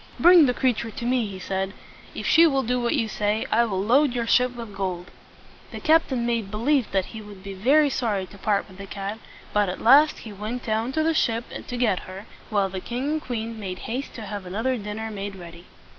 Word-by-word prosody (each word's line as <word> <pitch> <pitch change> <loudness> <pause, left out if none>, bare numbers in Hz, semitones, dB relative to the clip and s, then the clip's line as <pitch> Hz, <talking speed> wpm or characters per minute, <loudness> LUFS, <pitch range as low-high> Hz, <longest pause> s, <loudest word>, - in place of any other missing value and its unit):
"Bring 345 -3 +8
the 250 - 0
creature 235 -3 0
to 230 +2 -6
me," 245 -2 +1
he 195 -2 -7
said. 190 +1 -3 0.4
"If - - -5
she 330 +1 +6
will 270 -3 +1
do 250 +1 0
what 240 +4 +1
you 230 -6 0
say, 210 +1 -1
I 235 +2 +4
will 195 -5 -2
load 260 +5 +4
your 235 -1 0
ship 250 +1 +3
with 230 -4 -8
gold." 185 -2 -4 0.6
The - - -6
captain 300 -6 +2
made 230 -4 -1
believe 245 +5 +1
that 190 +2 -1
he 220 - -7
would 205 -2 -12
be 195 0 -6
very 275 +9 +3
sorry 210 -7 -1
to 200 - -15
part 205 0 0
with 190 -1 -15
the 195 - -7
cat; 200 +2 -5 0.3
but 205 -2 +2
at 180 - -5
last 285 +6 +6
he 215 - -8
went 215 +5 -5
down 225 +3 0
to 315 - +1
the 325 +1 +2
ship 230 -6 +1 0.2
to 245 - -4
get 225 -7 +2
her, 190 +3 -8 0.2
while 200 -3 +2
the 190 0 -5
king 250 +7 -3
and 310 0 -1
queen 230 -3 -4
made 185 -3 -5
haste 255 +5 -4
to 230 - -7
have 200 -2 -6
another 225 +8 -1
dinner 220 0 -5
made 200 -1 -5
ready. 170 -1 -11
225 Hz, 230 wpm, -24 LUFS, 200-250 Hz, 0.6 s, Bring